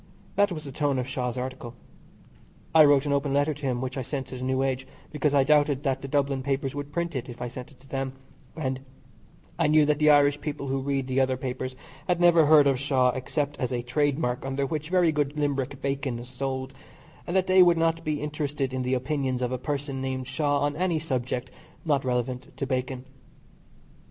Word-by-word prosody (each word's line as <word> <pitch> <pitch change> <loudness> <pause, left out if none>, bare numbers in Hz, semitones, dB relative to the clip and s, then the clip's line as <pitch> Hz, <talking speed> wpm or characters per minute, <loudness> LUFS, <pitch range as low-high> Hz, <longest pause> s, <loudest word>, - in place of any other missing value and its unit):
That 205 -1 +3
was 155 -3 -5
the 140 - -7
tone 140 0 0
of 125 0 -2
Shaw's 125 -2 -3
article. 125 -2 -5 1.0
I 160 -1 +9
wrote 145 -1 +4
an 145 - +1
open 140 0 0
letter 145 +2 +2
to 145 0 -8
him 125 -1 -1
which 130 +1 -3
I - - -1
sent 135 +1 -4
to - - -7
the 125 - -7
New 130 +1 +1
Age, 135 0 -2 0.2
because 150 -1 +1
I 140 - +5
doubted 145 -1 +3
that 135 -2 0
the 135 - -6
Dublin 140 -1 0
papers 135 0 -1
would 145 0 -6
print 170 0 -2
it 130 0 -4
if 120 - -9
I 125 - -3
sent 125 +1 -8
it 140 -4 -21
to 135 - -18
them, 135 -1 -3 0.4
and 130 -5 -2 0.8
I 165 - +3
knew 155 0 +5
that 150 0 +1
the 155 0 +5
Irish 145 0 +5
people 145 -2 -4
who 135 0 0
read 135 -1 -1
the 130 0 0
other 130 -1 +2
papers 130 0 -4 0.3
had 175 -1 +1
never 170 -3 +6
heard 150 -1 +7
of 135 -2 +2
Shaw, 130 -2 +2
except 140 +3 -3
as 125 -3 -1
a 120 -1 -2
trade 140 +3 +1
mark 125 -5 -1
under 135 +1 -1
which 155 +2 -4
very 180 -3 +4
good 145 -1 -1
Limerick 140 -2 -1
bacon 135 -2 -1
is 120 +1 -9
sold, 130 +1 -4 0.5
and 175 - -2
that 190 -1 +3
they 185 0 +6
would 175 -2 +6
not 165 0 +1
be 155 -2 -2
interested 145 -3 -2
in 130 - -1
the 130 +1 0
opinions 130 -1 -1
of 125 - -1
a 130 - -2
person 140 0 -3
named 130 -1 -3
Shaw 145 +1 0
on 145 0 0
any 175 0 +1
subject 130 -4 -3 0.3
not 145 -4 +2
relevant 125 0 -2
to 140 - -2
bacon. 130 -1 -3
135 Hz, 220 wpm, -26 LUFS, 130-150 Hz, 1.0 s, I